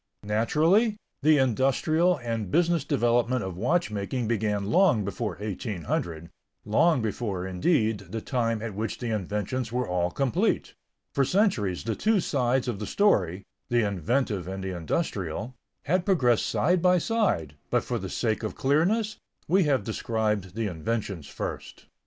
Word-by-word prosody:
Naturally, 160 - +2 0.2
the 155 0 +5
industrial 135 +7 +2
and 115 -5 -3
business 170 - +2
development 120 -3 +1
of 95 -2 -5
watchmaking 115 - -1
began 105 -3 0
long 150 - +4
before 100 -1 -3
1800, 85 - -4 0.3
long 130 +5 +3
before, 100 -4 -2
indeed, 110 - +1
the 110 +4 -3
time 115 -2 -1
at 115 -3 -4
which 110 +3 -3
the 120 -3 -3
inventions 105 +4 -2
were 125 -1 -1
all 90 -1 0
complete. 130 +5 0 0.4
For 140 - +3
centuries 130 - +1
the 110 +1 -2
two 220 -1 +2
sides 130 -5 0
of 115 -5 -2
the 105 - -4
story, 100 - +2 0.3
the 120 -3 +2
inventive 100 - -1
and 95 0 -5
the 95 -1 -3
industrial, 100 - -3 0.3
had 175 +4 +1
progressed 130 - +2
side 180 +2 +2
by 180 0 +5
side, 180 - 0 0.2
but - - +1
for - - -2
the - - -5
sake 110 -2 -1
of 110 - -4
clearness, 195 +11 +1 0.3
we 185 +2 +3
have 135 -7 +2
described 105 -3 -2
the 115 0 -1
inventions 100 -2 -3
first. - - -6
115 Hz, 145 wpm, -27 LUFS, 100-145 Hz, 0.4 s, the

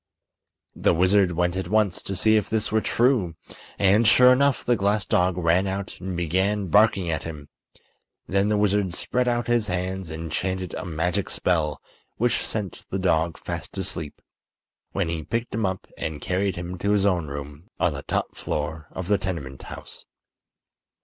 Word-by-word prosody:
The - - +2
wizard 95 +1 +4
went 90 +1 0
at 95 -2 -2
once 105 -2 +1
to 95 - -4
see 110 +4 +4
if 105 -3 +1
this 110 -1 -1
were 110 0 +2
true, 115 -11 +2 0.4
and, 105 +3 +4
sure 125 +3 +8
enough, 140 +1 +2
the 120 - +3
glass 100 0 +1
dog 90 0 +2
ran 90 +2 +2
out 95 +1 -4
and 95 -1 -4
began 95 +4 0
barking 100 -2 +4
at 80 - -1
him. 75 -4 -8 0.8
Then 100 +2 +2
the 105 - +2
wizard 100 -3 +1
spread 125 0 0
out 120 -1 +1
his 120 -3 +1
hands 90 0 -3
and 80 0 -6
chanted 95 +1 -2
a - - -5
magic 90 +3 -1
spell 80 -4 0 0.4
which 120 +1 +1
sent 105 -4 -4
the 95 - -2
dog 85 -3 +1
fast - - -6
asleep, 75 -3 -5 0.7
when 100 -3 -1
he 80 -1 -2
picked 115 +9 -3
him 110 -2 +1
up 95 0 -4
and 80 -2 -3
carried 95 +3 -1
him 90 0 -6
to 100 +2 +1
his 100 -1 +2
own 90 -5 +1
room 70 +3 -8
on - - +2
the - - -5
top - - -2
floor 75 +1 -3
of 95 - -6
the 105 0 +3
tenement 75 -8 -4
house. - - -9
95 Hz, 175 wpm, -25 LUFS, 85-105 Hz, 0.8 s, sure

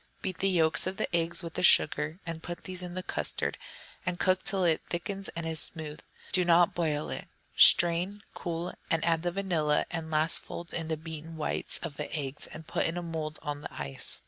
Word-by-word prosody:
Beat 185 -2 -3
the 195 - +3
yolks 160 -4 +3
of 190 +1 -3
the - - -1
eggs 170 +1 0
with 165 -1 -6
the - - -2
sugar, 155 -1 +4
and 165 -1 -5
put 175 +1 -7
these 185 -1 -4
in 180 0 -6
the 185 - -3
custard, - - 0 0.4
and 180 0 -2
cook 185 -1 +3
till 195 -1 +1
it 165 -3 +3
all - - -35
thickens 195 +3 -3
and 170 0 -3
is 160 -1 -2
smooth, 155 -1 -4
but - - -23
do 185 - +4
not 175 0 +5
boil 155 -3 -1
it. - - -5 0.3
Strain, 175 +4 +6
cool, 170 0 -4 0.2
and 165 0 +1
add 165 -1 +2
the 175 +1 -1
vanilla, 170 -6 +1
and 165 -2 -4
last 155 +1 +4
fold 170 0 -7
in 165 -2 -2
the 160 -1 -1
beaten 160 0 -8
whites 155 - -1
of 155 -4 -5
the 150 - -4
eggs, 140 -1 -3
and 160 0 -10
put - - 0
in 165 +2 -3
a 175 - -3
mould 160 -2 -3
on 145 -1 -4
the - - -7
ice. 70 -1 -5
165 Hz, 225 wpm, -30 LUFS, 155-175 Hz, 0.4 s, Strain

